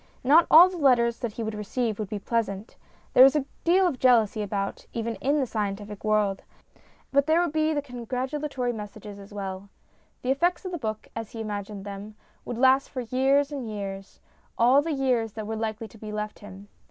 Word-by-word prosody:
Not 305 +6 +6
all 340 +3 +9
the 370 -1 -6
letters 240 -6 +3
that 235 -4 -4
he 230 - -4
would 220 0 -3
receive 215 +1 -2
would 210 -3 -4
be 210 - -3
pleasant. 205 -1 -3 0.4
There 255 - +9
is 270 +2 +6
a 290 -3 +1 0.2
deal 370 +3 +4
of 280 -8 -1
jealousy 230 -4 +4
about, 200 -1 -3
even 230 0 -2
in 285 +3 +1
the 270 - +1
scientific 205 -2 -4
world, 210 -2 +1 0.7
but 280 +1 +3
there 320 +2 +4
would 350 -3 +1
be 310 0 +1
the 290 -2 -1
congratula 260 +3 -4
tory 250 -3 -2
messages 210 -1 -9
as 200 +1 -13
well. 195 -1 -6 0.5
The 255 - +1
effects 345 +7 +1
of 370 - -4
the 345 - -4
book, 215 -4 -4
as 225 -2 -6
he 230 - -7
imagined 205 -2 -5
them, 205 +1 -8 0.3
would 245 - -5
last 265 +2 +4
for 255 - -4
years 270 +4 +2
and 265 -6 -5
years 195 -2 -7 0.4
all 250 +4 +5
the 325 +2 -3
years 250 -6 0
that 215 -1 -6
were 220 +1 -4
likely 220 0 -4
to 220 - -16
be 215 0 -7
left 210 0 -5
him. 205 -1 -12
230 Hz, 205 wpm, -26 LUFS, 210-270 Hz, 0.7 s, all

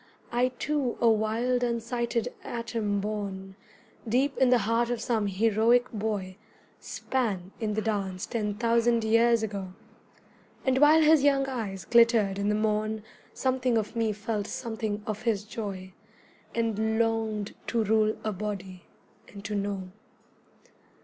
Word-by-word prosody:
I 245 +1 +2
too 290 -4 -1
a 235 - +3
wild 225 +3 +2
unsighted 235 0 -1
atom 225 -4 -2
borne 195 -2 -4 0.5
Deep 270 +5 +2
in 260 -1 +5
the 250 - +6
heart 230 +2 +1
of 245 -1 -1
some 220 -2 0
heroic 225 +5 +3
boy 205 -4 -3 0.4
Span 200 -8 -2
in 215 -3 -1
the 215 - -1
dance 195 -4 -2
ten 210 -3 -2
thousand 235 +1 +2
years 230 +1 +4
ago, 195 -3 -4 0.9
And 260 0 +3
while 305 +2 +6
his 310 -1 +6
young 275 -1 +4
eyes 205 -8 -4
glittered 230 -4 +4
in 200 +1 0
the 210 - +2
morn 215 0 0 0.3
Something 255 -2 +1
of 215 +1 -2
me 225 -2 +1
felt 210 0 -3
something 220 -3 -4
of 215 0 -4
his 220 -4 0
joy, 200 -4 -6 0.6
And 220 -1 0
longed 225 -2 0
to 230 -2 +1
rule 215 0 +2
a 215 - -1
body, 190 -2 -6 0.4
and 200 0 -12
to 210 - -3
know. 200 -2 -3
220 Hz, 140 wpm, -28 LUFS, 205-235 Hz, 0.9 s, the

